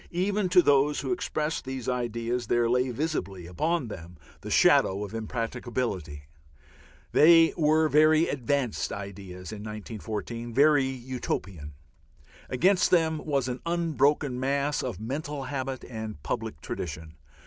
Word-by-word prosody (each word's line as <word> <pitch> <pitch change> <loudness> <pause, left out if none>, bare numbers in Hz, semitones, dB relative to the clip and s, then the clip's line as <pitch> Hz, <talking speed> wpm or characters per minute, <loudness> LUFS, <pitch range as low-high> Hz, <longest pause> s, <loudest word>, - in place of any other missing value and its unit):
Even 195 +2 0
to 180 -1 +6
those 145 +1 +3
who - - -3
expressed 155 - -2
these 130 -2 -6
ideas 120 -1 -2
there 120 +1 +2
lay 125 +2 +2
visibly 115 - -3
upon 155 - -1
them 85 -4 -9 0.2
the - - -8
shadow 100 +2 +4
of 100 - -10
impracticability; 115 - -3 0.9
they 165 +1 +6
were 155 0 +3
very 155 +2 +4
"advanced" 135 -2 -1
ideas 95 -2 -7
in 110 - -7
1914, 110 +2 -6
very 145 -1 +5
Utopian. 120 - -5 0.7
Against 180 +9 +3
them 160 -3 +2
was 140 -4 0
an 125 0 -4
unbroken 150 -5 +1
mass 140 +2 0
of 125 -5 -4
mental 140 +5 -4
habit 130 -1 -4
and 110 - -7
public - - -4
tradition. 80 -1 -6
130 Hz, 125 wpm, -27 LUFS, 110-150 Hz, 0.9 s, to